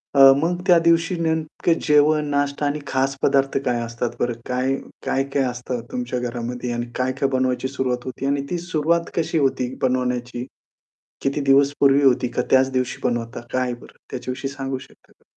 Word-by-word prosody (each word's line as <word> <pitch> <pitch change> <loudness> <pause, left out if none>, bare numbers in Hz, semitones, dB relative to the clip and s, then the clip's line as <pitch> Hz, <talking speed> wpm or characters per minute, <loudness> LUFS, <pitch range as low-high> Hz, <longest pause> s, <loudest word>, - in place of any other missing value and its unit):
अ, - - +4 0.2
मग 170 +4 0
त्या 175 -2 +7
दिवशी 165 +1 +2
नेमकं 160 0 0
जेवण, 150 0 +4
नाष्टा 145 0 0
आणि 145 +1 -1
खास 135 +1 0
पदार्थ 135 0 +2
काय 120 -1 +1
असतात 115 +1 -3
बरं 120 0 0
काय, 130 +2 0 0.3
काय-काय 135 0 0
असतं 125 -1 -3
तुमच्या 125 0 -3
घरामध्ये 125 0 -4
आणि 120 0 -2
काय-काय 130 +2 0
बनवायची 130 0 +1
सुरुवात 130 -2 -2
होती 130 +1 -5
आणि 140 0 0
ती 175 - 0
सुरुवात 170 -1 0
कशी 165 -1 0
होती 130 -3 0
बनवण्याची? 125 -1 -1 0.8
किती 140 +2 0
दिवस 140 0 +4
पूर्वी 140 0 +5
होती 125 -2 +4
का 125 - -1
त्याच 130 0 +5
दिवशी 130 -1 -1
बनवता? 120 -1 -2
काय 125 -1 0
बरं 120 - -16
त्याच्याविषयी 130 +2 -4
सांगू 135 -1 -4
शकता? - - -19
135 Hz, 165 wpm, -22 LUFS, 125-145 Hz, 0.8 s, त्या